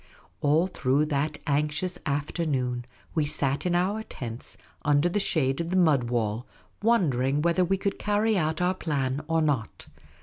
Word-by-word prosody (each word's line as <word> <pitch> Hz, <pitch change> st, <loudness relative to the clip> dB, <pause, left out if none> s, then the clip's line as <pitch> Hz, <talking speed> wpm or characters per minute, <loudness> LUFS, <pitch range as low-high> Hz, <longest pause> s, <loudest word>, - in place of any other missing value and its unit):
All 150 Hz, +4 st, +3 dB
through 145 Hz, -5 st, +1 dB
that 150 Hz, 0 st, -1 dB
anxious 150 Hz, +4 st, 0 dB
afternoon 140 Hz, -4 st, -1 dB, 0.3 s
we 155 Hz, -, +2 dB
sat 140 Hz, +2 st, 0 dB
in 175 Hz, -, +1 dB
our 195 Hz, +5 st, +1 dB
tents, 120 Hz, -, -7 dB, 0.3 s
under 145 Hz, +2 st, +3 dB
the 175 Hz, +4 st, 0 dB
shade 140 Hz, -6 st, +1 dB
of 170 Hz, -, -4 dB
the 185 Hz, -, -1 dB
mud 155 Hz, -9 st, +4 dB
wall, 115 Hz, -1 st, -1 dB, 0.3 s
wondering 150 Hz, -, +2 dB
whether 170 Hz, +2 st, +3 dB
we 195 Hz, +2 st, +1 dB
could 200 Hz, +1 st, -2 dB
carry 210 Hz, +1 st, +1 dB
out 160 Hz, -2 st, 0 dB
our 180 Hz, +1 st, +2 dB
plan 140 Hz, -6 st, -1 dB
or 165 Hz, -1 st, +2 dB
not. 135 Hz, -8 st, -1 dB
150 Hz, 160 wpm, -27 LUFS, 135-180 Hz, 0.3 s, mud